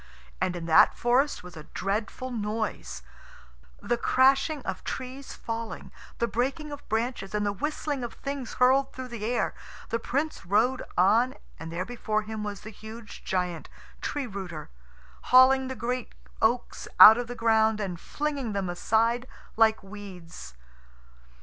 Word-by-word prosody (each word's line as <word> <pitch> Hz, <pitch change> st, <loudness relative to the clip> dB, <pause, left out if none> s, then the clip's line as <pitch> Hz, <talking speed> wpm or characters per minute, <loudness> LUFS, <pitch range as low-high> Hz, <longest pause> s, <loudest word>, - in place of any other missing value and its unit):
And 180 Hz, -, 0 dB
in 170 Hz, -1 st, -5 dB
that 160 Hz, -, +6 dB
forest 255 Hz, +2 st, +2 dB
was 180 Hz, -1 st, -11 dB
a 155 Hz, -2 st, -9 dB
dreadful 215 Hz, +6 st, -2 dB
noise 210 Hz, -, -3 dB, 0.8 s
the 240 Hz, -, 0 dB
crashing 270 Hz, +4 st, +3 dB
of 190 Hz, -, -4 dB
trees 260 Hz, +1 st, -6 dB
falling, 230 Hz, 0 st, -6 dB, 0.3 s
the 235 Hz, -, +1 dB
breaking 275 Hz, +6 st, -2 dB
of 290 Hz, 0 st, -9 dB
branches, 220 Hz, -3 st, -2 dB
and 210 Hz, 0 st, 0 dB
the 205 Hz, -, 0 dB
whistling 290 Hz, +3 st, -3 dB
of 240 Hz, -, -5 dB
things 275 Hz, -3 st, -5 dB
hurled 265 Hz, +2 st, +3 dB
through 255 Hz, -1 st, -7 dB
the 235 Hz, -3 st, -6 dB
air. 240 Hz, +3 st, 0 dB, 0.4 s
The 230 Hz, -, 0 dB
Prince 290 Hz, +7 st, -2 dB
rode 225 Hz, +9 st, +2 dB, 0.2 s
on, 230 Hz, +8 st, +4 dB, 0.2 s
and 165 Hz, 0 st, -7 dB
there 175 Hz, +2 st, -3 dB
before 215 Hz, -2 st, -2 dB
him 215 Hz, 0 st, -5 dB
was 205 Hz, -1 st, -5 dB
the 220 Hz, -, -9 dB
huge 220 Hz, +1 st, -11 dB
giant, 180 Hz, -3 st, -2 dB, 0.3 s
Tree 290 Hz, -2 st, -2 dB
rooter, 190 Hz, -, -7 dB, 0.5 s
hauling 260 Hz, +1 st, +6 dB
the 260 Hz, -, -4 dB
great 245 Hz, +2 st, -3 dB, 0.3 s
oaks -, -, 0 dB
out 220 Hz, +2 st, +11 dB
of 245 Hz, -, -3 dB
the 245 Hz, -, -6 dB
ground 220 Hz, -2 st, +3 dB
and 185 Hz, -5 st, -3 dB
flinging 285 Hz, -5 st, -3 dB
them 195 Hz, -3 st, -1 dB
aside 230 Hz, +7 st, +1 dB, 0.3 s
like 220 Hz, -1 st, +4 dB
weeds. 195 Hz, -, -10 dB
225 Hz, 150 wpm, -27 LUFS, 200-255 Hz, 0.8 s, out